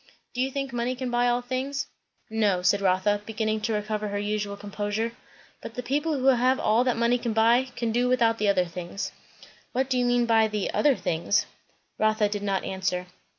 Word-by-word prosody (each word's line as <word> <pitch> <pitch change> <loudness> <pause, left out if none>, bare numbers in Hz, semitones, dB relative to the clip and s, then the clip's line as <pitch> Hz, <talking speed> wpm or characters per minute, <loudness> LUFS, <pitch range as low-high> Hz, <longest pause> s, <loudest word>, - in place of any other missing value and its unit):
"Do 250 - -2
you 265 - +1
think 275 -1 -4
money 240 +1 -1
can 250 -1 -4
buy 240 0 +2
all 245 0 +1
things?" 270 +3 -2 0.4
"No," 210 -5 +1
said 200 +3 +3
Rotha, 195 +2 +2
beginning 215 0 -2
to 225 +1 -1
recover 210 0 -2
her 205 0 -3
usual 205 0 -2
composure; 205 +2 -3 0.5
"but 225 - -8
the 250 - -4
people 295 +5 0
who 260 - -2
have 255 0 +4
all 225 +3 +3
that 250 -2 +1
money 235 +1 +2
can 235 -2 -2
buy, 230 +3 +4
can 235 -1 -1
do 245 +2 +1
without 230 -3 +2
the 210 - +1
other 185 -2 +3
things." 175 +3 -5 0.6
"What 265 +1 0
do 255 - +2
you 245 - +2
mean 245 0 +3
by 225 -1 +4
the 210 -2 -2
'other 290 -3 +3
things'?" 170 +3 0 0.5
Rotha 215 -1 +2
did 205 0 -3
not 195 -2 -1
answer. 185 -1 -2
225 Hz, 200 wpm, -26 LUFS, 205-245 Hz, 0.6 s, have